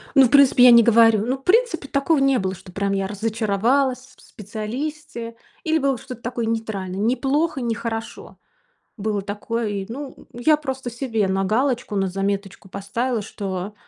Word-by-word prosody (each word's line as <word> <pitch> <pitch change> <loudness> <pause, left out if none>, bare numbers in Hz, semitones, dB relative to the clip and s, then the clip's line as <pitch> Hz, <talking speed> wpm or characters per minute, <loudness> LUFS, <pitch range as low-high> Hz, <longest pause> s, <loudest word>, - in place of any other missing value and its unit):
Ну, 270 -2 +8
в - - +1
принципе, 275 -2 +6
я 250 - +9
не 235 0 +8
говорю. 225 -2 +5
Ну, 260 +3 -1
в 270 - -23
принципе, 380 - +2
такого 280 +4 +1
не 275 -2 +3
было, 190 0 -2
что 185 - -14
прям 200 +1 -1
я 195 -1 -1
разочаровалась 225 +5 0
с 260 - -19
в - - -20 0.2
специалисте. 230 +3 -5 0.3
Или 320 -1 +1
было 275 -4 0
что-то 255 -1 -10
такое 240 -1 -3
нейтральное: 210 -4 -3
не 230 +4 +2
плохо, 290 +1 0
не 235 -1 -1
хорошо. 225 -1 -6 0.6
Было 210 0 -2
такое. 215 +3 -3
И, 200 -2 -3
ну, 270 +3 -7 0.2
я 300 +6 +3
просто 265 -4 -5
себе 230 -4 -1
на 190 0 0
галочку, 240 +2 0
на 195 -1 +1
заметочку 195 +1 -3
поставила, 220 +5 -2
что 195 -1 -5
230 Hz, 175 wpm, -22 LUFS, 205-265 Hz, 0.6 s, я